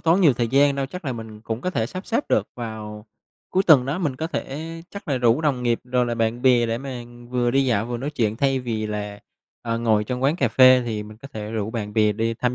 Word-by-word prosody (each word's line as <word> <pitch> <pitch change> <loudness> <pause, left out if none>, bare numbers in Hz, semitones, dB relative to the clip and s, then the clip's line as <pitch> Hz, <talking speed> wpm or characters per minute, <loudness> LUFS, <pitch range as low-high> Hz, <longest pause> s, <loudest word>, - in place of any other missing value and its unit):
tốn 170 +4 +3
nhiều 155 -7 +6
thời 120 -1 -1
gian 140 +2 +4
đâu, 135 -1 -2
chắc 180 +4 -8
là 130 - -1
mình 110 -2 -8
cũng 115 +1 -4
có 185 - -2
thể 115 -9 -1
sắp 185 +8 -7
xếp 235 +5 0
được 105 - +1
vào 110 -2 -7 0.4
cuối 190 - +2
tuần 145 -9 +6
đó, 150 +6 -1
mình 145 -8 -1
có 160 - -2
thể 145 -3 -4 0.3
chắc 200 -5 -9
là 135 -3 +1
rủ 120 +3 +3
đồng 140 -6 0
nghiệp 120 -1 +1
rồi 125 -1 +1
là 120 - -1
bạn 115 +1 -1
bè 125 -3 +4
để 115 +1 -1
mà 130 -2 -6 0.3
vừa 125 -1 +1
đi 135 +2 +3
dạo 115 -3 +1
vừa 120 0 -3
nói 140 +5 -4
chuyện 110 -6 -1
thay 135 -1 +1
vì 110 -3 -3
là, 105 -1 -5 0.4
ờ, 115 -1 -2
ngồi 110 -2 +2
trong 125 +3 -4
quán 145 +5 +2
cà 130 -7 +2
phê 130 +3 +6
thì 110 -3 -3
mình 105 0 -11
có 140 - -11
thể 105 -1 -6
rủ 110 -1 -2
bạn 105 -3 -4
bè 105 -1 +3
đi 115 +2 -1
tham 125 +2 -1
120 Hz, 270 wpm, -23 LUFS, 110-135 Hz, 0.4 s, nhiều